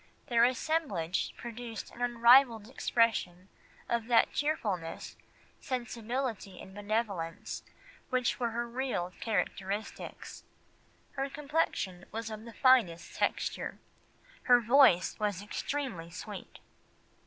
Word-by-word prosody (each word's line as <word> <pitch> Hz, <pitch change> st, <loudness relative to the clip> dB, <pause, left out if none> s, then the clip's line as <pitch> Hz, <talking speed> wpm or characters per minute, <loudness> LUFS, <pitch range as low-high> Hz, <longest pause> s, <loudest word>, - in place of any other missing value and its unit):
Their 235 Hz, -1 st, +5 dB
assemblage 245 Hz, -, 0 dB
produced 235 Hz, -1 st, -7 dB
an 245 Hz, -, -12 dB
unrivalled 240 Hz, -1 st, +5 dB
expression 225 Hz, -7 st, 0 dB, 0.4 s
of 235 Hz, -1 st, -1 dB
that 235 Hz, -2 st, +4 dB
cheerfulness, 205 Hz, -, -2 dB, 0.4 s
sensibility, 240 Hz, -4 st, -3 dB
and 190 Hz, -, -11 dB
benevolence, 205 Hz, -5 st, -3 dB, 0.5 s
which 255 Hz, 0 st, +1 dB
were 240 Hz, -2 st, +1 dB
her 235 Hz, +1 st, -2 dB
real 235 Hz, -8 st, -2 dB
characteristics. 205 Hz, -1 st, -3 dB, 0.7 s
Her 275 Hz, 0 st, -2 dB
complexion 280 Hz, -, -1 dB
was 225 Hz, 0 st, -4 dB
of 215 Hz, +1 st, -7 dB
the 230 Hz, -, -10 dB
finest 240 Hz, -12 st, +3 dB
texture. -, -, -1 dB, 0.7 s
Her 245 Hz, -1 st, +7 dB
voice 240 Hz, -6 st, +5 dB
was 205 Hz, -3 st, 0 dB
extremely 210 Hz, -, -3 dB
sweet." 170 Hz, -, -8 dB
230 Hz, 100 wpm, -31 LUFS, 200-250 Hz, 0.7 s, Her